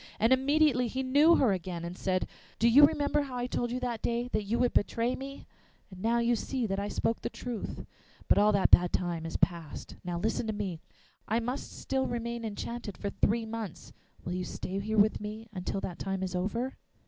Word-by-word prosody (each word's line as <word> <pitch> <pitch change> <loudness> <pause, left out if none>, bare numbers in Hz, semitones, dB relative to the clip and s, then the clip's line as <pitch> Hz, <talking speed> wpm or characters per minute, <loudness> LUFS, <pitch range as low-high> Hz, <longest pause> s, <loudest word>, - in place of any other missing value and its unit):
And 225 +4 +5
immediately 270 -1 +3
he 260 +3 -2
knew 290 +6 +6
her 245 -10 +4
again, 175 -2 -4
and 175 +1 -5
said: 185 -1 -1 0.3
'Do 230 - +3
you 285 +5 +9
remember 295 -1 0
how 270 -3 -5
I 245 - -1
told 245 -1 -1
you 250 +2 -2
that 240 -3 -2
day 240 +1 -1
that 215 -3 -1
you 225 +4 0
would 245 -1 +2
betray 230 +4 +1
me? 275 +1 -8 0.5
Now 225 +6 +1
you 235 0 +3
see 250 +2 -2
that 195 -2 -1
I 200 - -2
spoke 225 +2 -1
the - - -2
truth. 240 -4 -5 0.4
But - - +5
all 210 +1 +5
that 200 -2 +3
bad 175 0 +7
time 170 -2 -1
is 165 - -3
past. 170 -4 -2
Now 175 -1 -3
listen 220 +5 -1
to 220 - -1
me: 195 -5 -3 0.5
I 225 +2 +2
must 245 +4 -4
still 265 -1 -1
remain 235 0 -3
enchanted 220 -1 -5
for 200 - -3
three 225 +1 +1
months. 220 -5 -6 0.3
Will 175 - -2
you 180 0 -2
stay 185 +2 -4
here 220 +2 -2
with 210 +1 +4
me 215 +2 -6 0.2
till 195 - -2
that 175 - -5
time 195 -1 -2
is 185 -1 -3
over? 230 +8 -1
225 Hz, 210 wpm, -30 LUFS, 195-245 Hz, 0.5 s, you